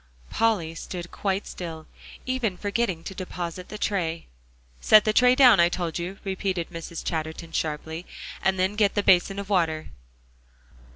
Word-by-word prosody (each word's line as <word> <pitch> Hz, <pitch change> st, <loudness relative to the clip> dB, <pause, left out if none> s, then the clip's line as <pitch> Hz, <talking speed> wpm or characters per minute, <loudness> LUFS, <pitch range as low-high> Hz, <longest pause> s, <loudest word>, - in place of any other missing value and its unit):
Polly 210 Hz, -8 st, +1 dB
stood 175 Hz, +1 st, -7 dB
quite 195 Hz, 0 st, -2 dB
still, 160 Hz, -3 st, -7 dB, 0.4 s
even 245 Hz, -7 st, -1 dB
forgetting 200 Hz, -4 st, -1 dB
to 190 Hz, -, -6 dB
deposit 180 Hz, -1 st, -6 dB
the 210 Hz, -, -6 dB
tray. 170 Hz, -6 st, -1 dB, 0.5 s
"Set 215 Hz, -, +6 dB
the 215 Hz, -, +2 dB
tray 250 Hz, +2 st, +5 dB
down, 250 Hz, -7 st, +7 dB
I 170 Hz, 0 st, +6 dB
told 175 Hz, -2 st, -3 dB
you," 180 Hz, +3 st, -5 dB
repeated 190 Hz, -3 st, -2 dB
Mrs. 165 Hz, -1 st, -7 dB
Chatterton 160 Hz, 0 st, -4 dB
sharply, 160 Hz, +2 st, -3 dB, 0.3 s
"and 190 Hz, 0 st, +1 dB
then 190 Hz, +2 st, +1 dB
get 210 Hz, -2 st, +2 dB
the 205 Hz, -, +1 dB
basin 190 Hz, +1 st, +4 dB
of 200 Hz, -1 st, -4 dB
water." 165 Hz, -6 st, 0 dB
185 Hz, 155 wpm, -25 LUFS, 165-205 Hz, 0.5 s, down